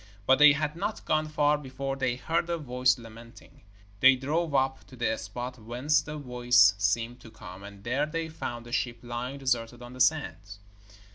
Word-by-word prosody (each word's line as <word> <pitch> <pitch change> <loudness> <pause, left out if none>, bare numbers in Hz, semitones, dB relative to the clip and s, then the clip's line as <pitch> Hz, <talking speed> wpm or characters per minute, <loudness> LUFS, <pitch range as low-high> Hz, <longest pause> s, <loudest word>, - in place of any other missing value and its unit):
But 130 +3 +4
they 150 -1 +9
had 150 +1 -2
not 200 +5 -4
gone 155 0 +1
far 150 -1 +2
before 135 0 -5
they 130 -2 -1
heard 165 +6 -1
a 170 - 0
voice 125 -3 +1
lamenting. 115 0 -14 0.4
They 130 +3 +7
drove 150 +4 -1
up 135 0 +1
to 130 - -13
the 115 -2 0
spot 120 +4 -6
whence 125 +7 +1
the 150 +1 -7
voice 125 -6 +4
seemed 115 +4 0
to 120 - -13
come, 90 -3 -11
and 100 0 -11
there 135 +6 0
they 165 +1 -3
found 120 -7 -6
a 120 - -11
ship 120 -1 -1
lying 120 +3 -5
deserted 120 -3 -2
on 120 +1 -10
the 130 - -5
sands. 125 -8 0
130 Hz, 190 wpm, -28 LUFS, 120-145 Hz, 0.4 s, they